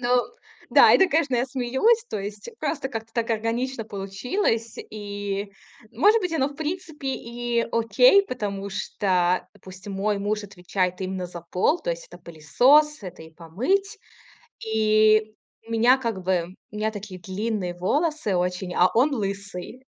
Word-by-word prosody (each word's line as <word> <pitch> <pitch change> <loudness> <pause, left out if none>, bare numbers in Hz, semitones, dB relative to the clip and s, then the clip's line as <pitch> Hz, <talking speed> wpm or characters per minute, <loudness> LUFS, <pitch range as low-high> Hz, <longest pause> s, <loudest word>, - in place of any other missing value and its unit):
Ну 245 0 +2 0.5
да, - - +7
это, 380 -1 +5
конечно, 295 -4 +1
я 245 +1 +2
смеюсь. 265 - +1
То 205 - -3
есть 205 - -7
просто 285 -4 -2
как-то 225 -3 -7
так 235 -1 -1
органично 230 +3 -1
получилось. 220 - -2
И, 205 -1 -4 0.4
может 415 - +4
быть, 360 -4 -2
оно, 275 -5 +1
в 285 - -12
принципе, 315 -2 -5
и 240 -2 -2
окей, 400 - +5
потому 200 - -4
что 185 -3 0
пусть 190 +1 -12
мой 200 +1 -1
муж 205 +1 -2
отвечает 185 -1 -2
именно 185 -1 -3
за 175 -1 -9
пол. 295 - +2
То - - -2
есть - - -5
это - - -13
пылесос, 250 - +3
это 180 -4 -9
и 160 - -13
помыть. 335 - -1 0.7
И 215 0 +3 0.3
меня 235 +3 +4
как 225 -7 -3
бы 180 -1 -1 0.2
у 210 - -11
меня 215 +1 0
такие 205 -3 -8
длинные 190 -1 -3
волосы 290 - 0
очень, 180 +1 -2
а 180 +1 +4
он 270 +6 +4
лысый. 200 +1 -5
215 Hz, 150 wpm, -24 LUFS, 195-265 Hz, 0.7 s, да